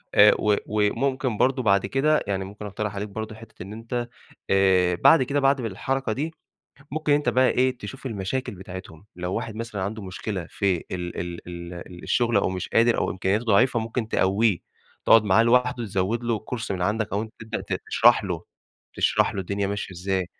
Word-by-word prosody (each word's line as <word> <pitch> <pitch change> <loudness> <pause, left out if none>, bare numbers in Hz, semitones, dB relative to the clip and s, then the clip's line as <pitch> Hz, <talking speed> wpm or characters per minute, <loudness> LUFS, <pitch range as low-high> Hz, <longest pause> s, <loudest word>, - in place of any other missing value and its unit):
آآ، 105 +1 +8
و 105 -1 +3
وممكن 115 +4 0
برضه 130 0 +2
بعد 100 -3 +3
كده، 145 +8 +2
يعني 95 -1 -1
ممكن 105 +2 -9
أقترح 105 0 -4
عليك 105 +1 -4
برضه 110 +1 -6
حتة 110 -4 -11
إن 100 +3 -9
أنت، 120 +2 -4 0.4
آآ، 95 -2 +4
بعد 130 - +6
كده، 140 +3 0
بعد 135 0 +3
الحركة 120 +3 -2
دي 155 +7 -3 0.6
ممكن 155 0 0
أنت 145 +1 +2
بقى 130 0 +4
إيه 130 -1 +1
تشوف 135 +1 -8
المشاكل 110 +2 -3
بتاعتهم، 95 -1 -10
لو 90 +1 -3
واحد 110 -1 -4
مثلًا 115 -4 -4
عنده 105 +3 -4
مشكلة 95 -1 -5
في 95 -3 +1
ال 90 -1 -4
ال 85 0 -6
ال 85 0 -8
الشغل 120 -2 +1
أو 100 - +3
مش 95 -1 -4
قادر 115 +1 +3
أو - - 0
إمكانياته 95 +4 0
ضعيفة، 120 +3 +3
ممكن 110 0 -3
تقوّيه 100 -1 +2 0.5
تقعد 115 -1 +7
معاه 105 +3 +4
لوحدُه 125 0 +2
تزوّد 100 +4 -1
له 115 -2 0 0.2
course 115 - -5
من 95 -2 -2
عندك 105 +2 -1
أو 100 - 0
أنت 110 -1 -8
تبدأ 110 0 -4
ت - - -7 0.2
تشرح - - +5
له - - -3 0.5
تشرح - - +2
له 95 - -2
الدنيا 100 +2 -2
ماشية 100 -1 -4
إزاي. 95 0 -1
105 Hz, 190 wpm, -25 LUFS, 95-120 Hz, 0.6 s, آآ